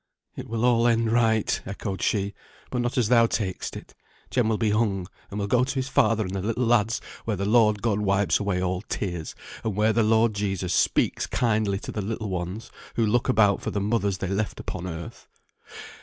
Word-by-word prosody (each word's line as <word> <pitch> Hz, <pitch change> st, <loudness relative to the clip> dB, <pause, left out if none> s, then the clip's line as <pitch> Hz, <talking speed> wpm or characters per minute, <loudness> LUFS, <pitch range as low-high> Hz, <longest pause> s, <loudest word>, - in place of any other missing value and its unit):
"It -, -, -8 dB
will 115 Hz, +1 st, 0 dB
all 120 Hz, -1 st, +4 dB
end 115 Hz, -1 st, +2 dB
right," 110 Hz, -2 st, +2 dB
echoed 100 Hz, 0 st, -5 dB
she; 100 Hz, -1 st, 0 dB, 0.4 s
"but 125 Hz, -, 0 dB
not 120 Hz, +1 st, -2 dB
as 120 Hz, -4 st, +3 dB
thou 115 Hz, -2 st, +5 dB
tak'st 100 Hz, -5 st, -3 dB
it. -, -, -12 dB, 0.4 s
Jem 120 Hz, -3 st, +2 dB
will 110 Hz, -, +1 dB
be 110 Hz, -2 st, +1 dB
hung, 105 Hz, -4 st, +1 dB, 0.2 s
and 100 Hz, -, -5 dB
will 100 Hz, -, -1 dB
go 125 Hz, +4 st, +3 dB
to 135 Hz, +2 st, -2 dB
his 130 Hz, 0 st, -2 dB
father 110 Hz, -2 st, +3 dB
and 95 Hz, -, -5 dB
the 95 Hz, -, -2 dB
little 115 Hz, +5 st, -1 dB
lads, 115 Hz, -1 st, +2 dB, 0.2 s
where 110 Hz, -3 st, -1 dB
the 100 Hz, -, -2 dB
Lord 105 Hz, -1 st, +3 dB
God 110 Hz, -3 st, +1 dB
wipes 100 Hz, -1 st, +2 dB
away 95 Hz, -3 st, -1 dB
all 90 Hz, 0 st, -1 dB
tears, 85 Hz, -5 st, -4 dB, 0.3 s
and 110 Hz, -3 st, -2 dB
where 110 Hz, +2 st, +3 dB
the 115 Hz, -, +3 dB
Lord 110 Hz, +1 st, +3 dB
Jesus 95 Hz, -3 st, -2 dB
speaks -, -, +1 dB
kindly 110 Hz, -4 st, +1 dB
to -, -, -6 dB
the 105 Hz, -, -3 dB
little 110 Hz, +1 st, -4 dB
ones, 90 Hz, +4 st, -4 dB, 0.2 s
who 115 Hz, -, +2 dB
look 115 Hz, +3 st, +1 dB
about 105 Hz, -2 st, +4 dB
for -, -, -3 dB
the 100 Hz, -, -2 dB
mothers 100 Hz, -1 st, 0 dB
they 95 Hz, -, -3 dB
left 100 Hz, +3 st, -2 dB
upon 95 Hz, 0 st, -5 dB
earth. 85 Hz, -1 st, -8 dB
105 Hz, 210 wpm, -25 LUFS, 100-115 Hz, 0.4 s, thou